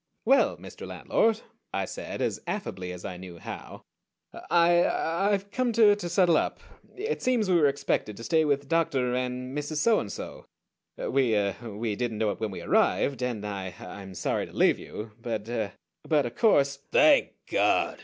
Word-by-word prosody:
"Well, 270 +4 +4
Mr. - - -10
Landlord," 225 0 +1 0.3
I - - -1
said, - - -5
as - - -1
affably 95 - -4
as 90 0 -8
I 90 - -5
knew 90 -1 -10
how, - - -9 0.7
"I 175 0 +5
I've 195 +4 0
come 255 -2 0
to 215 -2 +6
to 185 -4 -5
settle 170 -2 +4
up. - - -1 0.4
It 440 +4 -3
seems 245 -5 +1
we - - +4
were 145 - +6
expected 140 -7 -1
to 115 - -8
stay 160 +5 +3
with 140 -2 0
Dr. 135 -6 +1
and 125 +1 -3
Mrs. 150 +1 -3
Soandso. 210 - 0 0.5
We 130 -4 +1
er 100 -1 +1
we 110 -1 -3
didn't 115 -1 -2
know 105 -1 +1
it - - -7
when 110 -1 -2
we 95 - -7
arrived 135 -2 +2
and 120 -4 -2
I 95 -3 -5
I'm 95 -2 -9
sorry - - -1
to - - -16
leave - - +3
you; 105 +1 -8
but 110 -3 -3
er 110 -4 -2 0.3
but 150 -4 +1
of 120 - -4
course 140 - +3
" - - -43
"_Thank 300 -2 +5
God! - - +1
135 Hz, 180 wpm, -27 LUFS, 110-175 Hz, 0.7 s, to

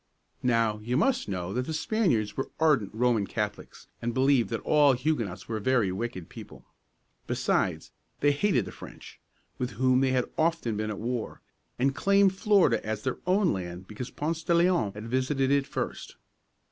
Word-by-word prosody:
Now, 115 -3 +1
you 120 +4 -1
must 245 - +1
know 90 -1 -3
that 125 +1 -2
the 160 - -3
Spaniards 155 - 0
were 135 - -3
ardent 150 -11 +3
Roman 115 -3 +1
Catholics, 105 0 -5 0.2
and 120 0 -2
believed 130 -2 +3
that 115 - -3
all 145 -2 +4
Huguenots 120 - -2
were 110 -1 -3
very 115 -3 +2
wicked 95 -3 -4
people. - - -12 0.6
Besides, - - 0 0.3
they 145 - +4
hated 145 - +1
the - - -8
French, - - -12 0.4
with 125 -1 -3
whom 130 +1 +3
they 135 - +3
had 130 -1 +1
often 160 -8 +1
been 110 +1 -2
at 105 - -4
war, 120 0 -4 0.3
and 135 +2 +1
claimed 200 -1 +4
Florida 190 - +3
as 110 -1 -4
their 130 - -2
own 190 0 +3
land 90 -1 -6
because 115 +3 -6
Ponce 160 +2 -3
de 170 +1 +1
Leon 170 - +3
had 105 +2 -8
visited 130 +2 0
it 140 -1 +2
first. - - -5
125 Hz, 170 wpm, -28 LUFS, 110-150 Hz, 0.6 s, all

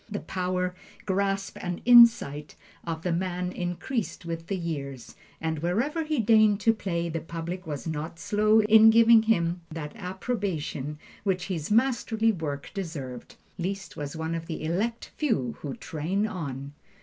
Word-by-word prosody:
The 205 -1 -3
power, 180 -1 -2 0.3
grasp 195 0 -1
and 180 -1 -3
insight 230 - +6 0.3
of 165 -1 -4
the 180 - 0
man 180 +1 -1
increased 180 +3 -3
with 165 0 -5
the 195 - -1
years, 140 -7 -5 0.2
and 160 -1 -2
wherever 235 - 0
he 305 -1 -1
deigned 215 -2 +5
to 225 - +4
play, 170 -5 -2
the 165 -1 -3
public 170 +2 -6
was 145 -3 -5
not 160 +1 -4
slow 210 +3 +3
in 220 +1 +8
giving 230 0 +7
him 175 -6 +1
that 155 +1 -6
approbation 185 - -3 0.3
which 185 -3 0
his 165 -5 -3
masterly 225 -1 +2
work 150 -7 -5
deserved. 150 - -6 0.2
Liszt 190 0 -4
was 145 +1 -5
one 160 +1 -3
of 165 0 -4
the 160 - -5
Elect 210 +9 -2
Few 140 - 0
who 140 -3 -4
train 175 +7 -2
on. 140 -8 -5
180 Hz, 150 wpm, -27 LUFS, 160-215 Hz, 0.3 s, in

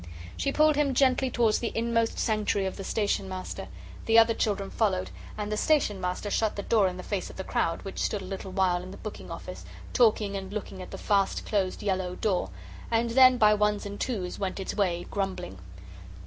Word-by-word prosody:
She 275 - -1
pulled 305 0 +4
him 280 -3 +2
gently 265 0 +3
towards 230 -3 +2
the 235 - -2
inmost 230 0 +1
sanctuary 210 -3 +1
of 190 - -3
the 195 - -6
Station 200 -2 -1
Master. 185 0 -6 0.4
The 225 0 +5
other 230 0 +7
children 200 -3 -1
followed, 190 -5 0 0.3
and 210 0 -3
the 210 - -1
Station 215 -9 +2
Master 180 +3 -3
shut 220 -2 +1
the 200 - -4
door 210 -3 +3
in 180 0 -4
the 185 - -7
face 200 -3 -3
of - - -11
the 190 - -5
crowd, 165 -2 -1
which 195 - -6
stood 205 -3 -1
a - - -7
little 190 0 -6
while 185 -2 +1
in 185 - -9
the 195 - -9
booking 215 - -8
office - - -7 0.3
talking 215 -4 +3
and 190 0 -5
looking 205 -2 -5
at 185 - -8
the - - -7
fast 200 -2 +1
closed 195 -3 -1
yellow 185 -2 -1
door, 185 - 0 0.4
and 230 +1 +1
then 255 +1 +7
by 210 -2 +6
ones 210 0 +1
and 205 0 -6
twos 195 -8 -3
went 195 -1 -2
its 190 - -3
way, 175 -4 0
grumbling. 190 - -3
205 Hz, 210 wpm, -28 LUFS, 190-225 Hz, 0.4 s, other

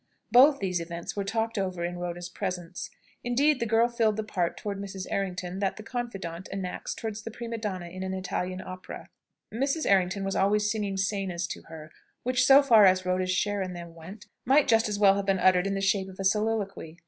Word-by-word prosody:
Both 275 +4 +7
these 185 -5 -1
events 170 0 -6
were 200 - -1
talked 225 +2 -1
over 185 -3 -2
in 175 0 -4
Rhoda's 175 0 -4
presence. 180 -2 -5 0.3
Indeed, 270 +4 +2
the 235 - -1
girl 225 +2 +4
filled 225 -3 +1
the 220 - -1
part 180 -5 -2
towards 200 -1 -4
Mrs. 195 -2 -6
Errington 185 -1 -3
that 195 -1 -1
the 215 - -8
confidant 195 -8 -5
enacts 190 -2 -4
towards 220 -2 -5
the 225 - -6
prima 230 0 -6
donna 190 -5 -4
in 185 +2 -8
an 190 0 -3
Italian 185 0 -3
opera. 185 0 -9 0.4
Mrs. 275 +7 0
Errington 195 0 +2
was 195 0 -2
always 210 +2 +2
singing 205 -3 -2
scenas 190 -3 -1
to - - -6
her, 155 -1 -10 0.3
which, 255 +1 +2
so 275 +1 +8
far 225 -7 +7
as 185 0 +3
Rhoda's 185 0 0
share 200 +2 0
in 185 -1 -3
them 170 -1 -9
went, 175 +6 -11 0.2
might 275 +3 +4
just 225 -1 +3
as 205 - -2
well 200 -1 +6
have 200 0 -3
been 195 -1 +3
uttered 185 0 +4
in 195 - -1
the 195 - -2
shape 195 -1 +1
of 190 - -13
a - - -2
soliloquy. 200 -5 -1
195 Hz, 210 wpm, -28 LUFS, 185-220 Hz, 0.4 s, so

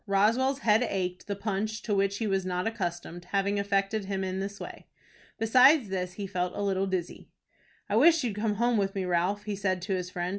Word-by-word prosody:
Roswell's 230 +8 +2
head 220 0 +4
ached, 180 -2 -3
the 200 - -2
punch, 215 +2 -3
to 215 - -1
which 200 0 +1
he 225 - -2
was 195 -2 0
not 180 0 -2
accustomed, 175 -5 -4
having 200 +2 0
affected 200 +1 0
him 195 -1 -2
in 185 0 -3
this 200 +1 -5
way. - - -9 0.5
Besides 250 +2 +5
this 180 -1 -3
he 200 - -5
felt 180 -1 -2
a 205 - -2
little 195 -1 0
dizzy. 185 -2 -4 0.6
"I 205 - -1
wish 320 +4 +5
you'd 225 -5 -2
come 210 0 -1
home 235 +1 +2
with 195 -1 -1
me, 190 -1 -1
Ralph," 180 +4 0
he 210 -1 -3
said 190 -1 -1
to 195 +1 -2
his 180 -1 -4
friend. 175 -1 -3
200 Hz, 215 wpm, -28 LUFS, 185-215 Hz, 0.6 s, Besides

